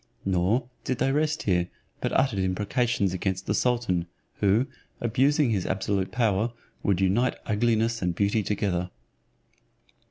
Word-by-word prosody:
Nor 95 +7 +1 0.2
did 130 - -1
they 135 - +1
rest 155 +2 0
here, 90 -3 +1 0.3
but - - -1
uttered 130 -7 +2
imprecations 100 +2 0
against 95 0 -2
the 105 - 0
sultan, 110 -8 +1 0.3
who, 105 +5 +3 0.3
abusing 135 +3 +2
his 95 -5 0
absolute 95 0 -1
power, 115 -1 +1 0.3
would 100 -3 +1
unite 100 +7 +2
ugliness 115 +1 +1
and 90 -2 0
beauty 100 +3 +2
together. 95 -3 -1
105 Hz, 130 wpm, -26 LUFS, 95-120 Hz, 0.3 s, who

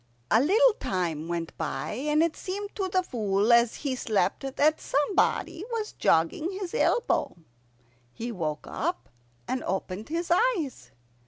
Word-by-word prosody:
A 220 - +6
little 440 - +5
time 165 -4 -2
went 170 -1 -4
by, 135 +3 -3
and 300 +7 +1
it 335 -2 0
seemed 400 +2 -5
to 390 -3 -2
the 370 0 +1
Fool 210 - +1
as 235 -1 +4
he 265 -2 0
slept 220 +1 0
that 310 +2 +3
somebody 325 +3 +1
was 445 -2 -2
jogging 165 - +2
his 370 -4 -5
elbow. 480 0 +1 0.8
He 235 - -5
woke 155 -7 -3
up 345 +4 -3 0.4
and 260 - -2
opened 190 +4 -3
his 335 +2 -2
eyes. 345 - +1
275 Hz, 145 wpm, -27 LUFS, -, 0.8 s, A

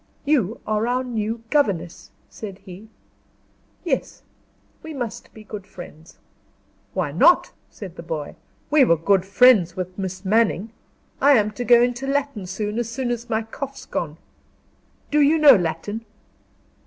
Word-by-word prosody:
"You 245 -8 +1
are 215 +1 0
our 250 +1 0
new 225 -2 -3
governess," 185 - 0 0.2
said 200 -4 -9
he. 190 +3 -11 1.0
"Yes. 300 -8 -3 0.6
We 315 -1 -8
must 240 -5 -6
be 220 - -13
good 205 -2 -9
friends." 165 -3 -12 0.8
"Why - - -1
not!" - - +4 0.2
said 185 -4 -10
the - - -6
boy. 160 -3 -5 0.4
"We 300 -2 +6
were 170 -9 +4
good 190 +3 +2
friends 200 -5 +5
with 185 -1 -5
Miss 190 0 -5
Manning. 215 0 +1 0.5
I 285 +1 +6
am 215 -4 +3
to 225 +4 -5
go 240 0 +6
into 245 +2 -2
Latin 275 -8 -2
soon 210 +4 -3
as 235 -1 -2
soon 245 +1 -3
as 240 0 -4
my 220 -1 0
cough's 275 +5 -8
gone. 155 -2 -4 0.9
Do 300 0 +4
you 295 +3 +4
know 295 -4 +8
Latin?" 180 +5 -3
220 Hz, 150 wpm, -22 LUFS, 185-255 Hz, 1.0 s, know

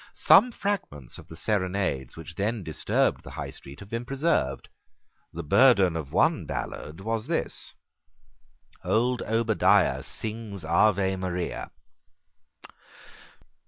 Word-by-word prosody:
Some 240 +5 +6
fragments 195 - -4
of - - -14
the 80 - -10
serenades 95 - -1
which 80 0 -9
then 105 +3 -2
disturbed 80 -3 0
the - - -10
High - - -6
Street 70 +1 -11
have 100 - -11
been 115 +1 -2
preserved. 135 - 0 0.6
The 85 - -6
burden 100 - +5
of 80 -4 -5
one - - +2
ballad 80 +5 -5
was 110 +1 -2
this: - - -2 1.1
"Old 120 +2 +1
Obadiah 115 0 +2
Sings 105 -5 -6
Ave 95 +2 +3
Maria." 90 -1 -3
100 Hz, 115 wpm, -27 LUFS, 80-115 Hz, 1.1 s, Some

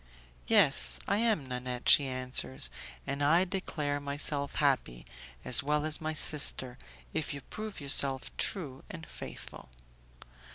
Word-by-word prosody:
"Yes, - - +4
I - - +1
am 220 -10 +1
Nanette," 125 -1 -5
she 140 - +6
answers; 125 - -2 0.3
"and 140 - -4
I 165 +6 +4
declare 150 -6 -3
myself 140 0 -1
happy, 125 - 0 0.4
as 125 - +4
well 150 +2 -1
as 155 +1 +1
my 155 0 -3
sister, 140 -4 +3 0.3
if 150 -1 -3
you 140 - -8
prove 215 +4 -8
yourself 140 -2 +1
true 140 -9 -2
and 165 -3 -8
faithful." - - -10
145 Hz, 130 wpm, -30 LUFS, 130-155 Hz, 0.4 s, she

